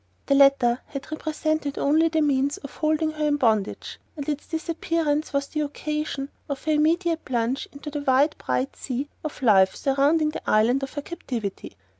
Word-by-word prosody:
The - - +2
latter 275 -3 +5
had 275 +1 -7
represented 310 -2 -2
only 315 +3 +3
the 320 -1 +1
means 280 -1 +1
of 280 - -10
holding 310 0 +1
her 305 -1 -2
in 290 0 +2
bondage, 220 -6 0 0.2
and 285 - -5
its 295 -1 -3
disappearance 320 -2 -1
was 280 -1 0
the 305 - -3
occasion 300 -1 -3 0.2
of 280 -1 -4
her 315 - +1
immediate 325 +2 +2
plunge 245 +1 -1
into 290 +1 -8
the 290 0 -3
wide 280 +2 +3
bright 265 +2 -1
sea 270 +2 -4
of 305 -3 -6
life 190 -5 +5
surrounding 285 +3 +2
the - - -6
island 230 +5 +3
of 270 - -5
her 290 - -4
captivity. 235 - -5
285 Hz, 175 wpm, -25 LUFS, 270-310 Hz, 0.2 s, latter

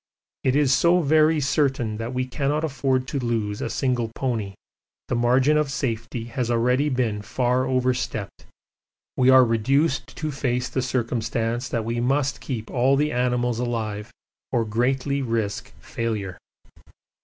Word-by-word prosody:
It 130 0 +2
is 145 -3 +3
so 170 +8 +4
very 155 +1 +4
certain 135 -6 0
that 115 +2 -4
we 130 0 -1
cannot 145 +4 -1
afford 135 -3 0
to 140 - -2
lose 110 -4 -2
a - - -2
single 125 -4 0
pony 110 -7 -2 0.5
the - - 0
margin 130 +5 +3
of 150 -2 +1
safety 115 -3 -3
has 120 +1 -3
already 125 +5 +2
been 120 -6 -1
far 125 +4 0
overstepped, 125 -5 -2 0.7
we 130 0 +4
are 130 -1 +8
reduced 130 +6 +1
to 155 -1 -3
face 125 -2 -1
the 130 - -1
circumstance 120 -1 -1
that 115 -2 -2
we 115 +1 -2
must 135 +2 0
keep 115 -5 -5
all 130 +2 +3
the 150 +2 +1
animals 125 -1 0
alive 110 -3 -3 0.4
or 120 -3 +1
greatly 130 +5 0
risk 115 - -2
failure. 105 - -3
125 Hz, 145 wpm, -24 LUFS, 115-135 Hz, 0.7 s, are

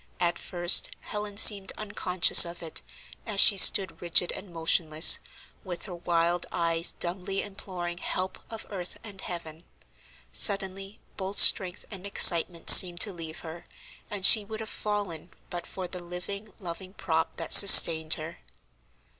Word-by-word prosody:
At 175 -1 -4
first, 175 -1 0
Helen 210 -1 -10
seemed 200 -3 +3
unconscious 185 -4 +2
of 170 0 -12
it, 160 - -9 0.5
as 210 -3 -5
she 200 - +6
stood 190 0 +2
rigid 175 0 0
and 190 -2 -11
motionless, 160 -1 +1 0.4
with 180 -3 -9
her 190 - -12
wild 170 0 -4
eyes 170 0 -4
dumbly 185 +2 -6
imploring 185 -4 -10
help 185 0 -8
of 225 -1 -12
earth 180 -3 -9
and 200 -3 -13
heaven. 165 -2 -12 0.7
Suddenly 195 0 -3 0.2
both 195 +1 -8
strength 185 -2 +3
and 195 -1 -11
excitement 170 -3 +3
seemed 175 -2 +7
to 205 - 0
leave 165 -1 -11
her, 165 +1 -13 0.5
and 205 -4 -4
she 215 0 +5
would 220 +2 -12
have 220 -1 -10
fallen 200 -6 -8 0.2
but 175 -1 -10
for 185 -1 -10
the 180 0 -12
living, 190 +4 -10
loving 185 0 -12
prop 160 -1 -6
that 165 - -5
sustained 160 -5 +6
her. 155 +2 -13
180 Hz, 145 wpm, -23 LUFS, 170-200 Hz, 0.7 s, seemed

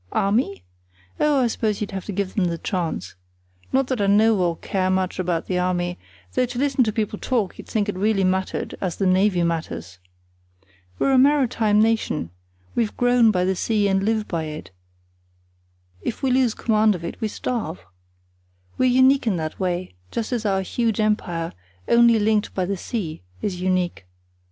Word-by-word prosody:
Army? 200 - 0 0.6
Oh, 290 -3 +3
I - - +3
suppose 220 -3 -1
you'd 210 - -3
have 190 -2 -5
to - - -4
give 195 -1 -2
them 195 - +1
the 170 -1 -1
choice. 165 - -3 0.6
Not 265 +1 +2
that 255 -4 -2
I 200 - +2
know 215 +3 +5
or 170 -2 +1
care 185 -1 -1
much 185 -1 0
about 175 -2 -1
the 180 -1 -1
Army, 180 -1 -1 0.3
though 250 - +2
to 245 0 -7
listen 270 -1 +2
to 215 - 0
people 215 -1 -2
talk 230 -8 -1
you'd - - -9
think 215 -2 0
it 205 - -1
really 200 +1 +1
mattered 190 0 -1
as 180 -4 -2
the 195 - -1
Navy 185 -1 +3
matters. 160 - -3 1.0
We're 275 - +2
a 260 - +6
maritime 255 -7 +3
nation—we've 90 - -2
grown 245 -2 +4
by 180 -4 +2
the 190 +1 +1
sea 210 +2 +1
and 195 -1 +2
live 215 +1 0
by 165 -2 -2
it; 155 -6 -7 1.3
if 235 - -4
we 265 - +2
lose 250 -3 +2
command 215 -2 +2
of 170 -1 -7
it - - -7
we 220 - +1
starve. 215 -6 -4 1.0
We're 255 - +4
unique 260 +1 +4
in 205 - +2
that 155 -1 -4
way, 180 - -2 0.2
just 230 0 -3
as 230 -3 -1
our 195 -1 +1
huge 225 +2 -1
empire, 175 -6 0 0.3
only 235 -1 +5
linked 215 0 +1
by 185 - 0
the 200 +2 -1
sea, 180 - -4 0.2
is 180 -3 -2
unique. 180 - -1
200 Hz, 180 wpm, -23 LUFS, 180-225 Hz, 1.3 s, a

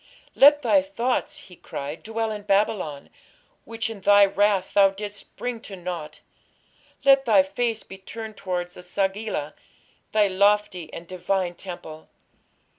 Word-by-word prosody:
"Let 290 +1 +6
thy 290 - +4
thoughts", 255 -3 -2
he 180 - -13
cried, 145 -1 -7
"dwell 225 0 -3
in 210 -1 -5
Babylon, 200 -7 0 0.5
which 225 -1 -3
in 225 -3 -8
thy 205 +1 +7
wrath 200 -1 +1
thou 200 -1 +6
didst 205 +1 -9
bring 245 -2 -4
to 200 - -9
naught. 175 -4 -6 0.8
Let 275 0 +6
thy 205 -5 +5
face 225 +3 -2
be 190 - -12
turned 220 +2 -8
towards 180 -2 -4
E - - -11
sagila, 190 -3 -2 0.6
thy 210 -1 +4
lofty 200 -3 +1
and 170 - -8
divine 185 0 -2
temple. 170 -4 -9
200 Hz, 140 wpm, -24 LUFS, 180-220 Hz, 0.8 s, thy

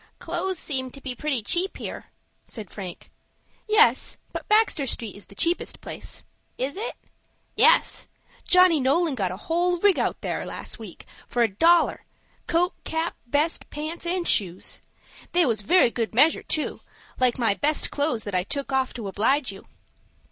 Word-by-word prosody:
"Clothes 350 +2 -2
seem 260 -5 -1
to 275 - -11
be 265 -2 -4
pretty 260 -2 -1
cheap 360 - +1
here," - - -6 0.4
said 215 -5 -8
Frank. 185 -4 -8 0.6
"Yes, 435 +1 +4 0.2
but - - -6
Baxter 425 -10 +3
Street 225 -4 -4
is 200 -3 -12
the 200 - -14
cheapest 340 - 0
place." - - -8 0.3
"Is 265 +3 -2
it?" 440 +5 -4 0.6
"Yes. - - +4 0.4
Johnny 365 -3 +5
Nolan 290 +4 +2
got 195 -8 -1
a 185 - -6
whole 350 - 0
rig 395 +1 +3
out - - -1
there - - -2
last - - -6
week, 210 -6 -10 0.2
for 240 - +1
a - - +4
dollar,—coat, 340 - +1
cap, 320 +1 -2
vest, 295 +6 0
pants, 315 +3 -5
and 355 0 -1
shoes. 185 -3 0 0.5
They 350 -1 +5
was 225 -5 0
very 240 - +4
good 225 -2 -3
measure, 305 +6 +5
too, 310 - -2 0.4
like 255 -2 +3
my 225 -5 +2
best 295 +8 0
clothes 285 -7 0
that 205 - -6
I 180 - +2
took 275 +8 -4
off 265 -1 0
to 225 -4 -5
oblige 235 +7 +1
you." 195 - -13
285 Hz, 160 wpm, -25 LUFS, 230-345 Hz, 0.6 s, Johnny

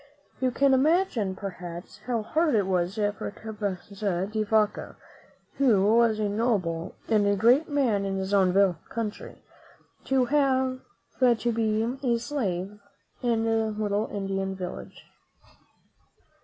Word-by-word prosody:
You 260 - +2
can 275 +2 +3
imagine, 265 - +2
perhaps, 180 -1 -8
how 235 -3 -1
hard 315 +3 +1
it 205 -3 +2
was 180 0 0
for 205 -1 -2
Cabeza 200 -3 -4
de 215 +2 -3
Vaca, 215 0 0 0.6
who 215 -6 +4
was 230 -2 +4
a 215 -1 0
noble 200 -6 -1
and 210 -2 +3
a 200 - +3
great 245 +10 +4
man 250 -9 +1
in 195 -1 -2
his 190 +1 -3
own 190 -2 +4 0.4
country, 225 -2 -6 0.6
to 265 -1 +2
have 260 -2 +1 0.4
to 240 -2 +3
be 225 +3 0
a 240 -4 +1
slave 210 -6 -3 0.4
in 230 -3 +1
a 225 0 +1
little 210 0 -1
Indian 195 -1 -3
village. 180 -1 -8
215 Hz, 130 wpm, -26 LUFS, 195-240 Hz, 0.6 s, who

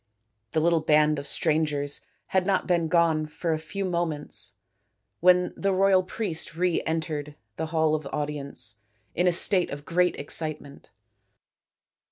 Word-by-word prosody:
The 160 - +2
little 165 +1 +3
band 150 -1 +3
of 140 - -7
strangers 150 -2 0 0.3
had 190 0 +1
not 195 -2 +1
been 170 -3 +1
gone 160 -2 +2
for 160 +2 -2
a 155 - -2
few 195 +5 -5
moments 170 -4 -3 0.7
when 180 0 +4
the 195 - 0
royal 190 0 +4
priest 180 -4 -4
re 180 -1 +1
entered 155 -2 -3 0.2
the 160 +4 -3
hall 160 -1 +1
of 155 -2 -2
audience 140 -7 -3 0.3
in 180 +2 +1
a - - +5
state 180 +1 +5
of 145 +1 -7
great 180 +1 +1
excitement. 145 -1 -3
160 Hz, 145 wpm, -26 LUFS, 150-180 Hz, 0.7 s, a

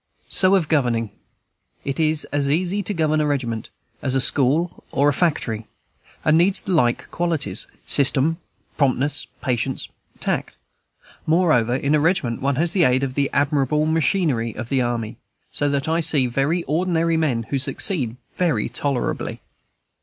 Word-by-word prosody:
So 190 +1 +5
of 175 -6 +1
governing; 120 -8 0 0.7
it 140 +1 -3
is 155 -1 +2
as 145 -1 0
easy 180 +6 0
to 205 - -3
govern 155 -1 +1
a 150 - +1
regiment 120 -6 -2 0.3
as 130 -1 0
a - - +3
school 145 +7 +1
or 140 +2 +2
a - - +1
factory, 115 -10 -1 0.6
and 155 - +4
needs 185 +5 +2
like 125 -10 +1
qualities, 160 - -2 0.2
system, 140 +3 +3 0.4
promptness, 140 +1 0 0.2
patience, 130 0 -2 0.3
tact; - - -2 0.7
moreover, 155 -8 +3
in 140 +2 0
a 150 - +4
regiment 150 -7 0
one 140 0 +1
has 165 +5 +1
the 185 - +3
aid 130 0 +3
of 130 -1 -2
the 140 0 0
admirable 145 +1 +1
machinery 155 - 0
of 115 - -6
the 135 -2 +1
army, 120 -3 -2 0.3
so 145 - 0
that 140 0 -1
I 165 +1 +1
see 150 -5 +3
very 140 +8 0
ordinary 165 0 0
men 140 -8 0
who 140 - +1
succeed 130 - 0 0.2
very 150 -14 0
tolerably. 130 +1 -2
145 Hz, 155 wpm, -22 LUFS, 130-165 Hz, 0.7 s, So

